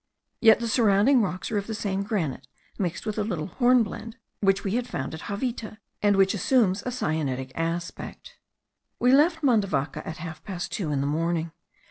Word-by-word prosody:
Yet 225 -2 +7
the 235 - -2
surrounding 225 +3 +4
rocks 185 -1 -3
are 210 - +1
of 200 - -7
the 220 - -3
same 195 -2 -2
granite, 165 - -2 0.3
mixed 180 -1 -2
with 215 0 -2
a - - +1
little 180 -8 -2
hornblende, 230 +1 +1 0.2
which 195 -1 +2
we 195 - -1
had 245 +3 -1
found 135 - -4
at 160 - -7
Javita, 215 0 -3 0.2
and 205 -1 +4
which 195 +1 +4
assumes 205 -1 +2
a - - -1
syenitic 155 - -2
aspect. 170 - -5 0.6
We 250 - +3
left 315 +4 +4
Mandavaca 195 - +1
at 160 - -5
half 160 -1 -8
past 180 -3 -5
two 170 -7 -2
in 140 -2 0
the - - -1
morning. 165 +2 -1
200 Hz, 180 wpm, -26 LUFS, 165-230 Hz, 0.6 s, Yet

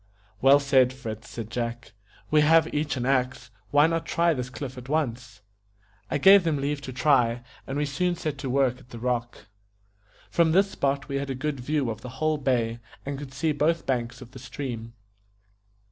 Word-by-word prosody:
"Well 135 +2 +7
said, 135 -3 +4
Fritz," 115 -3 -7
said 115 -2 -7
Jack; 120 0 -4 0.4
"we 155 0 +5
have 160 +2 +4
each 150 -1 -1
an 125 - -2
axe. 130 -1 0 0.2
Why 145 +1 +5
not 165 0 -1
try 170 0 +2
this 125 -3 -4
cliff 130 0 -6
at 125 +1 -10
once?" 125 -7 -2 0.7
I - - 0
gave 195 +6 +7
them 160 -3 +1
leave 140 +1 -2
to 135 - -7
try, 125 -3 +2 0.2
and 135 - -3
we 150 - +1
soon 175 +6 0
set 155 -4 -4
to 135 -1 -4
work 130 -1 +1
at 125 - -19
the 120 - -9
rock. 120 -2 -3 0.9
From 165 -2 +3
this 195 +2 +4
spot 140 0 -1
we 140 -1 -2
had 140 0 -3
a 135 - -2
good 140 +1 -3
view 135 -1 -1
of 110 0 -7
the 125 - -7
whole 155 0 +1
bay, 120 -4 0 0.3
and 140 0 -3
could 140 -2 -8
see 155 +4 0
both 155 +3 +1
banks 120 -1 -2
of 120 - -16
the 130 - -11
stream. 120 -2 -6
135 Hz, 195 wpm, -26 LUFS, 125-150 Hz, 0.9 s, Well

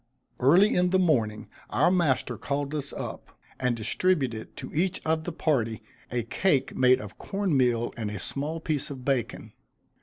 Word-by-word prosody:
Early 175 +11 +5
in 180 0 +3
the 190 - +3
morning, 120 -13 +1 0.2
our - - +3
master 170 -8 +1
called 145 +1 -3
us 145 -2 -3
up; - - -7 0.2
and 125 -2 0
distributed 130 - 0
to - - -7
each 175 +4 0
of 160 0 0
the 175 - -2
party 115 -9 0 0.3
a 120 -1 -1
cake 135 - +1
made 130 0 +5
of 105 -1 -10
corn 195 -5 -1
meal 120 -3 +2
and 110 -3 -3
a 105 - -5
small 145 - -3
piece 155 -3 -2
of 130 -3 -8
bacon. 135 -5 -2
140 Hz, 170 wpm, -27 LUFS, 120-165 Hz, 0.3 s, Early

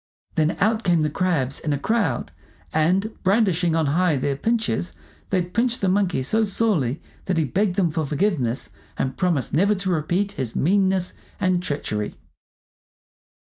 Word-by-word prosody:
Then 155 +1 +1
out 220 +3 +2
came 170 -3 +3
the 150 - 0
crabs 150 -7 0
in 150 - -1
a - - 0
crowd, 225 +11 0 0.4
and 185 +7 +2
brandishing 185 -5 +2
on 160 -1 +2
high 160 +2 +2
their 140 +1 0
pinchers 225 +1 -1 0.3
they 185 -2 +2
pinched 235 +8 0
the 195 - +2
Monkey 185 -8 +1
so 220 +12 +2
sorely 195 - 0 0.3
that 185 -2 0
he 160 - +2
begged 185 - 0
them 180 -5 +2
for 160 +1 -1
forgiveness 140 - -1 0.3
and 130 0 -1
promised 170 -8 0
never 200 +7 +3
to 190 -1 -2
repeat 175 +5 0
his 125 - -4
meanness 190 +1 +2 0.3
and 185 -2 +2
treachery. 140 -11 -3
180 Hz, 155 wpm, -23 LUFS, 150-200 Hz, 0.4 s, came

